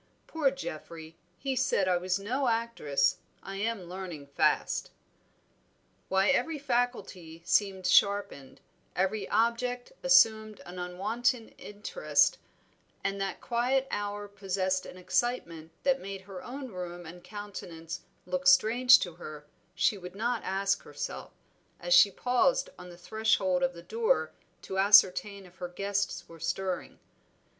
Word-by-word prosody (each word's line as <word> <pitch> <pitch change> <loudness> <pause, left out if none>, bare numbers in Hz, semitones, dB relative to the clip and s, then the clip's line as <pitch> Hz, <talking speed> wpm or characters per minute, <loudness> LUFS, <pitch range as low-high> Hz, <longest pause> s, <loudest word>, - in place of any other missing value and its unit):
Poor 310 -4 +1
Geoffrey! 165 - -8 0.2
he 270 -1 -2
said 245 -7 +1
I 180 -1 +3
was 185 +1 0
no 250 +7 -1
actress; 225 - +1 0.3
I 195 0 -6
am 220 -1 -2
learning 175 -4 -7
fast." 140 - +1 1.2
Why 190 +1 +3
every 315 +3 +1
faculty 240 - -2
seemed 195 -2 +1
sharpened, 200 -7 +2 0.3
every 190 +2 -1
object 235 +3 0
assumed 220 -6 +4
an 180 +1 -8
unwonted 220 +7 -1
interest, 335 - +1 0.6
and 195 0 -2
that 195 - -3
quiet 255 +3 +1
hour 205 0 -3
possessed 190 -2 -2
an - - -10
excitement 180 -4 -2
that 270 -1 +2
made 195 0 -6
her 190 -1 -9
own 265 +1 -7
room 175 -3 -7
and 175 +2 -11
countenance 180 -6 -7 0.2
look 180 0 -2
strange 235 +7 +7
to 175 -4 -3
her, 155 -3 -9 0.3
she 195 +3 +2
would 180 +1 -9
not 235 +2 -1
ask 195 +1 0
herself, - - -6 0.5
as - - 0
she - - +8
paused - - +1
on 180 - -10
the 175 - -12
threshold 190 -2 +1
of 175 0 +1
the 170 - -11
door 465 +2 +1 0.3
to 190 - -3
ascertain 200 0 +5
if 180 0 -18
her 180 - -5
guests 200 +2 -2
were 165 0 -13
stirring. 185 +3 -3
195 Hz, 135 wpm, -29 LUFS, 180-235 Hz, 1.2 s, she